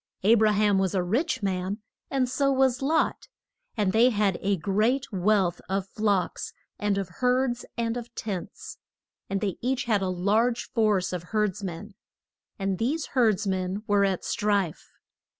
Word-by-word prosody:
A 215 +4 +6
bra 220 -2 +4
ham 205 -1 +3
was 190 0 0
a 185 - +2
rich 235 - 0
man, 190 +1 -1 0.3
and 265 -2 +1
so 275 +2 +1
was 265 -1 +2
Lot, 310 +4 +1 0.5
and 205 -3 +2
they 235 +3 +6
had 205 -5 +1
a 200 0 +1
great 215 - +1
wealth 190 -2 +1
of 195 0 -1
flocks, 200 -4 -1 0.3
and 205 -2 0
of 195 -2 -2
herds, 250 -1 +1
and 230 0 -1
of 240 -1 -6
tents. 195 -5 -6 0.5
And 195 0 -1
they 200 -4 -2
each 255 +1 0
had 215 -4 +1
a 190 - 0
large 215 +7 +1
force 210 -5 +1
of 180 - -2 0.2
herds 205 -1 0
men. 195 +3 -6 0.6
And 195 -2 -2
these 285 +7 -1
herds 220 -5 +3
men 190 +1 -2
were 205 -1 +3
at 195 -2 0
strife. 200 -6 -1
210 Hz, 165 wpm, -26 LUFS, 190-235 Hz, 0.6 s, A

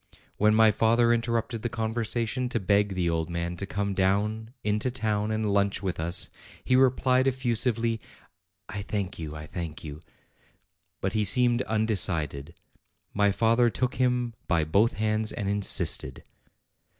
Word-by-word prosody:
When 105 +1 +4
my 110 -1 +6
father 115 +2 +3
interrupted 115 -1 -1
the 120 - -2
conversation, 115 +2 -1
to 120 - -1
beg 100 0 +1
the 90 -2 0
old 80 0 -1
man 85 0 -3
to 100 - -5
come 100 0 -2
down 105 +4 0
into 105 +4 0
town 110 -4 -1
and 110 -2 -1
lunch 100 -1 +1
with 95 -4 -3
us, 85 +3 +1 0.3
he 130 - +2
replied 130 0 +3
effusively, 115 -3 0 0.7
"I 100 0 -5
thank 100 -3 -4
you, 75 -2 -6
I 75 0 -7
thank 85 -1 -6
you," 75 0 -8 1.0
but 95 0 -1
he 110 - +1
seemed 120 +3 +3
undecided. 85 - 0 0.6
My 100 0 +3
father 115 +3 +3
took 125 +2 -2
him 125 -2 +1
by 85 -2 +2
both 100 +9 +2
hands, 110 0 -1
and 105 -4 -4
insisted. 100 0 -1
105 Hz, 150 wpm, -27 LUFS, 95-115 Hz, 1.0 s, my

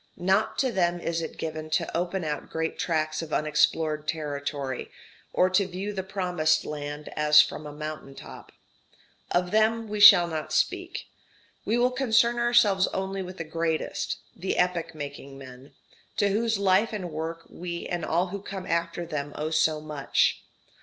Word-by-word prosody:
Not 190 +5 +1
to 260 -2 +1
them 175 -4 +1
is 165 -1 -2
it 160 - -6
given 155 -1 -5
to - - -1
open 175 +2 -1
out 150 -1 -4
great 160 0 -3
tracts 155 -2 0
of 160 -2 -8
unexplored 150 0 +1
territory, 145 -4 -3 0.4
or 180 - +3
to 190 +1 +3
view 190 +3 -5
the 190 - -2
promised 180 -5 0
land 145 0 -6
as 150 0 +6
from 150 0 +2
a - - -7
mountain 150 -2 -7
top. - - -11 0.8
Of 180 0 0
them 220 +1 +2
we 210 0 -4
shall 180 -4 +10
not 155 -2 -4
speak; - - -1 0.6
we 225 - +1
will 245 +1 +3
concern 240 -2 +2
ourselves 235 -5 +4
only 190 0 -3
with 185 0 -8
the 165 - -3
greatest, 165 0 -2 0.2
the 185 +2 -3
epoch 175 -2 0
making 140 -2 -8
men, 130 +1 -13 0.4
to 205 - +3
whose 225 +2 +1
life 200 +3 +2
and 185 -5 -4
work 165 +2 -5
we 170 -1 -6
and 175 -2 -3
all 175 +4 0
who 200 +1 -5
come 190 -1 -6
after 170 0 -1
them 145 -2 -4
owe 155 +1 -3
so 155 -1 +2
much. 150 -2 0
170 Hz, 165 wpm, -27 LUFS, 155-190 Hz, 0.8 s, shall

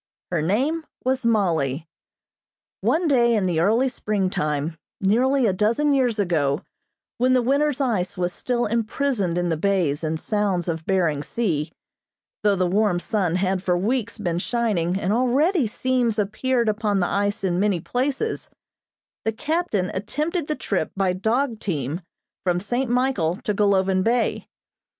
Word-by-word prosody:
Her 170 -3 +1
name 265 - 0 0.2
was 260 -1 0
Mollie. 165 - +1 0.9
One 335 +1 +1
day 240 -5 +4
in 205 -3 +1
the 175 -3 +1
early 225 +9 +3
springtime, 170 - -1 0.2
nearly 250 +7 +3
a 200 - +2
dozen 230 +9 +2
years 250 -5 +2
ago, 155 -7 +1 0.6
when 255 +1 +3
the 255 - +4
winter's 280 +2 +1
ice 210 -9 -1
was 180 0 -1
still 240 -1 -1
imprisoned 230 -4 0
in 175 0 0
the 165 - 0
bays 170 -5 +1
and 160 0 -1
sounds 200 -4 0
of 160 -2 -3
Behring 170 -7 +1
Sea, 160 -5 -2 0.7
though 205 -1 +3
the 185 -1 +1
warm 190 0 +2
sun 180 -3 -1
had 185 0 0
for 180 -2 +1
weeks 230 +4 -1
been 175 -5 -1
shining 195 -6 0
and 195 +1 0
already 260 - +2
seams 245 0 0
appeared 230 +4 0
upon 210 -2 +1
the 180 - +2
ice 205 +3 -1
in 180 -2 +1
many 200 -3 +2
places, 270 - -2 0.7
the 220 - +1
captain 225 - -1
attempted 300 - -2
the 305 - -1
trip 190 - -2
by 190 -2 +2
dog 225 +5 0
team 155 - -3 0.4
from 175 -1 +1
St. 245 +6 -1
Michael 245 -10 +1
to 210 - 0
Golovin 195 -2 +2
Bay. 235 +2 0
210 Hz, 150 wpm, -23 LUFS, 180-245 Hz, 0.9 s, day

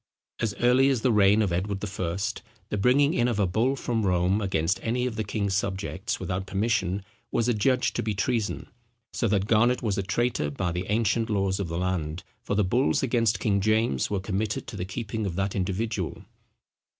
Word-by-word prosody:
As 110 -4 -1
early 125 +5 +4
as 130 -4 +1
the 125 - +3
reign 105 0 +5
of 95 -4 0
Edward 95 +3 -1
the - - -2
First, 95 +2 -3 0.3
the 105 - -1
bringing 140 +8 +4
in 120 - +2
of 120 -4 0
a 100 - +3
bull 115 +9 +1
from 120 -4 -1
Rome 90 +2 +2
against 95 -1 0
any 125 +2 0
of 125 -3 -2
the 110 - -1
king's 100 -2 -2
subjects, 100 +1 -2
without 95 +1 -3
permission, 95 -1 0 0.3
was 115 0 +1
adjudged 125 +2 +1
to - - +1
be 110 -1 -2
treason; 110 +2 -1 0.5
so 115 - 0
that 100 -2 +1
Garnet 120 +4 +3
was 105 -3 0
a - - +2
traitor 100 -4 0
by 85 +5 -2
the 90 +2 -3
ancient 110 +1 +1
laws 95 -2 0
of 100 - -2
the 85 0 -3
land, 90 -3 -2 0.2
for 100 - -2
the 105 - +3
bulls 120 +10 +1
against 115 -4 +2
King 100 -2 +1
James 110 - +1
were 100 - -1
committed 100 +2 -2
to 115 - -8
the 90 -2 -3
keeping 105 +2 -4
of 85 - -4
that 95 +1 -1
individual. 95 0 -2
100 Hz, 200 wpm, -26 LUFS, 95-115 Hz, 0.5 s, reign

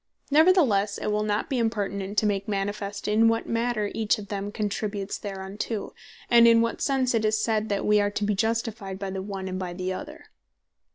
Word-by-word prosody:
Neverthelesse, 285 - +4
it - - -2
will 210 0 +1
not 210 0 -1
be 265 -3 -1
impertinent, 205 -3 -2
to 215 - +3
make 200 0 0
manifest 200 0 -3
in 215 +2 +4
what 225 0 +1
manner 230 -3 -1
each 220 -2 +1
of 205 -2 -9
them 200 0 -3
contributes 205 -1 -3
thereunto; 200 +2 -5 0.3
and 235 -1 +7
in 230 0 +6
what 230 0 0
sense 265 -3 +1
it 225 -1 +1
is 215 0 +2
said, 220 -1 0
that 200 -1 -1
we 210 0 +4
are 205 - +1
to 205 +1 -3
be 210 0 +1
Justified 220 -2 -2
by 195 -1 -4
the 190 0 -4
one, 195 -1 -5
and 185 0 -4
by 180 -2 -4
the 185 +1 -3
other. 300 +10 -8
210 Hz, 205 wpm, -26 LUFS, 200-225 Hz, 0.3 s, and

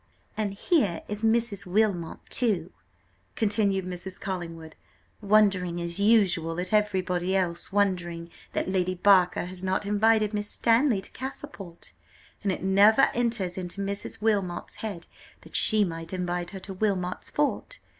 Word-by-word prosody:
"And 205 -2 -2
here 200 - +1
is 210 +1 -3
Mrs. 225 -3 +1
Wilmot 185 -4 0
too," 195 -9 0 0.6
continued 205 -3 +1
Mrs. 185 +1 -6
Collingwood, 165 -4 -6 0.5
"wondering 195 -4 +3
as 170 +2 -2
usual, 190 -6 +3
at 180 +3 -3
everybody 190 -3 +1
else, 175 -2 -1
wondering 175 -4 -1 0.2
that - - -1
Lady 185 -1 0
Barker 180 -2 +4
has 185 +1 -8
not 190 +2 -1
invited 215 +1 +2
Miss 205 0 -2
Stanley 230 -2 +2
to - - -8
Castleport; 225 - -8 0.5
and 200 - 0
it 185 - -4
never 200 +6 +5
enters 225 -7 -1
into 180 +2 -6
Mrs. 200 0 -4
Wilmot's 200 -5 -1
head 200 -6 -6 0.4
that - - -12
she 215 -1 +5
might 165 -1 -5
invite 180 -1 -2
her 195 - -7
to 195 - -7
Wilmot's 185 -2 -2
fort. 295 +11 -1
195 Hz, 140 wpm, -27 LUFS, 180-210 Hz, 0.6 s, never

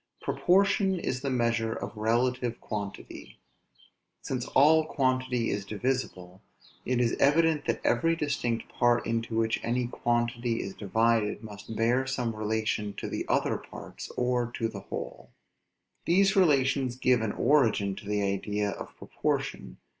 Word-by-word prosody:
Proportion 195 0 +2
is 130 -5 -3
the 140 - -2
measure 115 -3 0
of - - -6
relative 120 +2 0
quantity. 100 -2 -7 0.9
Since 125 -2 -3
all 155 +3 +5
quantity 130 -5 0
is 100 - -2
divisible, 100 -4 -3 0.4
it 125 0 0
is 120 -2 +2
evident 155 +1 +3
that - - 0
every 165 0 +2
distinct 140 -7 -2
part 120 -1 +2
into 115 0 -2
which 115 0 +1
any 125 +1 0
quantity 120 0 -1
is 95 - -6
divided 110 +2 +1
must 105 0 -9
bear 120 +4 +1
some 125 -4 -2
relation 105 -1 -1
to - - -5
the - - -3
other - - +1
parts, - - -10
or 125 -1 0
to 115 - -1
the 105 -3 -7
whole. - - -7 0.8
These 195 +3 +4
relations 135 -7 +3
give 125 -2 +2
an 110 -2 -1
origin 115 -8 +2
to 100 - -10
the 105 -1 0
idea 100 +1 -1
of - - -9
proportion. - - -3
120 Hz, 140 wpm, -28 LUFS, 110-130 Hz, 0.9 s, all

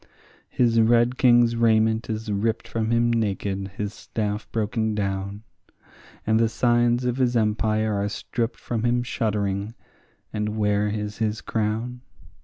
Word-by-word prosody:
His 115 -2 +3
red 120 +2 +3
king's 120 -2 +5
raiment 110 -1 +2
is 110 -1 -3
ripped 110 +3 -1
from 110 -1 -2
him 120 0 +2
naked, 100 -3 -1
his 105 0 -3
staff 105 -1 -4
broken 110 0 -1
down; 100 0 -3 0.8
And 110 0 +3
the 115 -1 +3
signs 120 +1 +2
of 125 0 0
his 125 -2 +1
empire 110 0 +1
are 100 0 -1
stripped 115 +2 -3
from 115 -2 -3
him 120 0 +2
shuddering; 105 -3 -2 0.6
and 105 0 -2
where 105 -1 +1
is 105 0 -4
his 110 -1 -1
crown? 115 +3 -2
110 Hz, 140 wpm, -24 LUFS, 105-115 Hz, 0.8 s, king's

